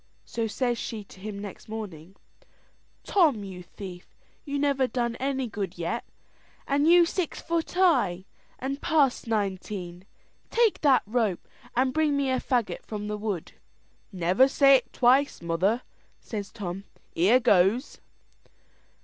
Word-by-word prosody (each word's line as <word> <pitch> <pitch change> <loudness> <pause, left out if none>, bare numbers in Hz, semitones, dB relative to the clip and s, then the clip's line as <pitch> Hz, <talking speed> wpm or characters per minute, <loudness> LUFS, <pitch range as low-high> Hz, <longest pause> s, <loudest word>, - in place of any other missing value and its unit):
So 230 -1 -2
says 240 +1 -1
she 220 -2 -5
to 195 - -16
him 205 +1 -6
next 200 +1 -9
morning, 195 -5 -7 0.9
"Tom, 305 - +3
you 190 -2 -8
thief, 180 0 -10 0.3
you 285 -1 -3
never 280 -2 +2
done 235 -1 -1
any 270 -1 -1
good 200 -5 -5
yet, 175 +8 -2 0.6
and 285 +2 +2
you 345 +1 +7
six 340 -1 -3
foot 335 -1 -2
high, 260 - +2 0.3
and 275 +2 -4
past 290 -8 +2
nineteen; 190 -4 -3 0.4
take 460 -3 +2
that 275 -4 +4
rope 215 -4 -1 0.3
and 255 +1 +2
bring 305 -2 +2
me 275 -2 +1
a 255 - +1
faggot 245 -4 -1
from 210 -1 -5
the 210 - -2
wood." 205 -6 -3 0.6
"Never 185 +7 +3
say't 275 -3 +4
twice, 265 +3 +3
mother," 185 +8 0 0.4
says 205 -4 -6
Tom 195 -3 -6 0.3
"here 200 +10 +4
goes." 210 +5 +2
230 Hz, 135 wpm, -27 LUFS, 195-275 Hz, 0.9 s, you